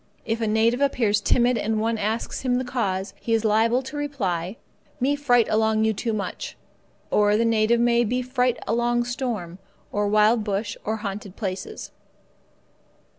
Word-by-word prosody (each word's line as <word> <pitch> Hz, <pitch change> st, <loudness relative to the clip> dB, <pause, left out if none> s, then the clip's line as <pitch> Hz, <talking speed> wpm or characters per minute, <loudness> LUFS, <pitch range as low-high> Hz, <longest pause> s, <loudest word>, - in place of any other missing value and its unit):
If 225 Hz, +1 st, -2 dB
a 225 Hz, -, +1 dB
native 225 Hz, +4 st, +2 dB
appears 225 Hz, -7 st, +2 dB
timid 245 Hz, +2 st, +2 dB
and 220 Hz, 0 st, 0 dB
one 225 Hz, 0 st, 0 dB
asks 220 Hz, +3 st, -2 dB
him 255 Hz, -2 st, +1 dB
the 255 Hz, -, 0 dB
cause, 200 Hz, -6 st, -2 dB
he 230 Hz, -, +1 dB
is 225 Hz, 0 st, -1 dB
liable 225 Hz, +4 st, +3 dB
to 260 Hz, -, -8 dB
hear 295 Hz, -, -4 dB
in 290 Hz, -, -2 dB
reply: 190 Hz, -, -2 dB, 0.4 s
"Me 275 Hz, +3 st, +2 dB
fright 245 Hz, -5 st, +3 dB
along 220 Hz, 0 st, +2 dB
you 220 Hz, -, +2 dB
too 225 Hz, +3 st, -2 dB
much." 210 Hz, -2 st, -4 dB, 0.5 s
Or 210 Hz, 0 st, +4 dB
the 230 Hz, -, +2 dB
native 225 Hz, +1 st, +3 dB
may 235 Hz, 0 st, +3 dB
be 250 Hz, +3 st, -1 dB
fright 250 Hz, -1 st, 0 dB
along 240 Hz, +2 st, +1 dB
storm, 235 Hz, -8 st, -4 dB, 0.3 s
or 205 Hz, 0 st, 0 dB
wild 215 Hz, +2 st, +4 dB
bush, 205 Hz, 0 st, -2 dB
or 220 Hz, -, -1 dB
haunted 205 Hz, -2 st, -6 dB
places. 190 Hz, -2 st, -5 dB
225 Hz, 175 wpm, -24 LUFS, 210-245 Hz, 0.5 s, Or